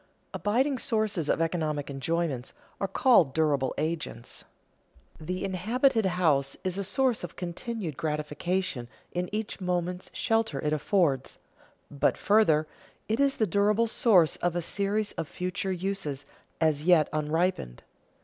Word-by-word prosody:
Abiding 255 +6 +1
sources 215 -8 0
of 165 - +2
economic 155 -4 -1
enjoyments 140 -1 -2 0.3
are 195 - 0
called 185 - +4
durable 145 -4 +2
agents. 155 -7 -4 0.8
The 180 +4 -4
inhabited 225 +5 +2
house 155 -7 +1
is 185 0 -2
a - - -1
source 255 +2 +1
of 175 - -7
continued 180 - -5
gratification 150 -1 -2 0.2
in 180 0 -2
each 215 -1 -4
moment's 180 0 -2
shelter 225 0 0
it 150 -1 0
affords; 150 -4 +1 0.5
but, 145 - +1
further, 200 -8 +4 0.4
it 220 +3 0
is 280 -1 +3
the 220 - +3
durable 210 +4 +2
source 195 - +4
of 175 -1 -1
a 175 - 0
series 205 +3 -1
of 165 - -5
future 180 +3 -3
uses, 180 -7 -3 0.3
as 155 -2 +2
yet 170 -3 +5
unripened. 155 - -1
180 Hz, 130 wpm, -28 LUFS, 155-205 Hz, 0.8 s, yet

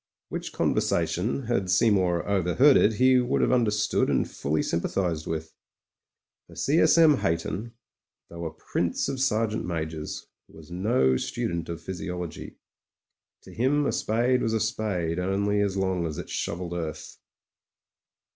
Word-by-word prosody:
Which - - -5
conversation, 90 +10 0
had 110 -6 -1
Seymour 95 -3 +2
overheard 100 - +4
it, 110 - +4
he 130 +3 +4
would 125 +1 +1
have - - +2
understood 110 -5 +1
and - - +1
fully 75 +2 -2
sympathised 85 -1 -1
with. 80 -1 -4 0.9
For - - -15
C. 150 +4 +1
S. 160 - +5
M. 160 -4 +6
Hayton, 95 +7 -2 0.5
though 85 0 -7
a 80 - -3
prince 85 +2 -2
of 135 -1 -3
sergeant 110 -4 0
majors, 80 -3 -4 0.2
was 80 0 -15
no 90 - +2
student 85 +4 -3
of 85 -1 -6
physiology. 90 -2 -6 0.9
To - - -13
him 140 +5 +1
a - - +1
spade 120 +3 +1
was 115 - 0
a - - +1
spade 100 -6 -1
only 100 +2 0
as 100 -1 0
long 95 -3 0
as 75 - -6
it - - -7
shovelled 85 0 -3
earth. 80 -3 -6
95 Hz, 145 wpm, -26 LUFS, 85-115 Hz, 0.9 s, M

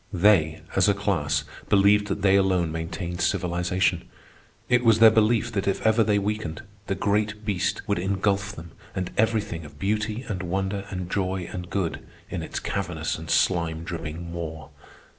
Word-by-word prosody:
They, 90 -5 +3
as 95 +1 +4
a 100 - +3
class, 75 -8 0 0.3
believed 100 +1 +5
that 100 0 -3
they 95 -1 +5
alone 95 -4 +2
maintained 85 +2 -4
civilization. 90 +1 0 0.6
It 125 0 +3
was 115 -2 +5
their 115 0 +8
belief 115 +2 +2
that 100 -3 -2
if 100 - -1
ever 110 +1 +5
they 105 -1 +2
weakened, 100 -5 -3 0.2
the 95 - 0
great 105 +1 0
beast 100 -5 -1
would 100 -3 +1
ingulf 100 +2 0
them 85 +1 -10 0.2
and 90 -1 -3
everything 110 -6 0
of 75 -1 -12
beauty 105 - -1
and 95 -4 -3
wonder 95 +2 -2
and 90 -1 -4
joy 95 -2 -1
and 90 -1 -6
good 95 -5 -2 0.3
in - - -3
its - - -4
cavernous - - -3
and - - -9
slime 85 -3 +1
dripping 85 0 -6
maw. 80 -2 -6
95 Hz, 165 wpm, -25 LUFS, 85-105 Hz, 0.6 s, their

